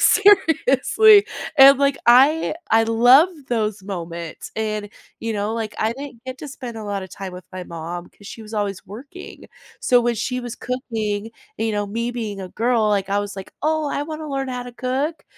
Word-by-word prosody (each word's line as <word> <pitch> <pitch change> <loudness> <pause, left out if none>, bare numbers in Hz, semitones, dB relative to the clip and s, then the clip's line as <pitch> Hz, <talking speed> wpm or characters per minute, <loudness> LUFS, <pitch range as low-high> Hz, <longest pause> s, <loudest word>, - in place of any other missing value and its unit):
Seriously. 410 +1 +5 0.3
And 275 0 +9
like, 280 -1 +2
I 275 +7 +5 0.2
I 225 0 +5
love 245 +9 +6 0.2
those 215 -4 -1
moments 170 -4 -7
and, 215 -1 -2 0.3
you 225 0 -3
know, 205 +2 -2
like, 220 -2 -4
I 220 +1 +1
didn't 265 -2 -10
get 260 0 -7
to 295 - -8
spend 250 -4 -8
a 215 - -7
lotta 200 -2 -4
time 190 0 -8
with 180 - -10
my 185 -1 -6
mom 170 +1 -7
'cause 205 - -17
she 225 - -9
was 215 +1 -10
always 200 -2 -3
working. 280 - -11 0.4
So 245 -1 +4
when 240 0 0
she 250 +3 -2
was 240 -1 -6
cooking, 225 -4 -3 0.3
you 225 -1 -1
know, 205 0 -1
me 230 +4 -3
being 215 -5 -5
a 185 - -7
girl, 230 0 +1
like 200 -1 0
I 200 - +2
was 205 -1 -4
like, 190 - -9
"Oh, 310 0 +1
I 285 - -2
wanna 310 0 -6
learn 270 -1 -2
how 250 -1 -4
to 245 - -9
cook." 265 +6 -3
230 Hz, 195 wpm, -21 LUFS, 205-270 Hz, 0.4 s, And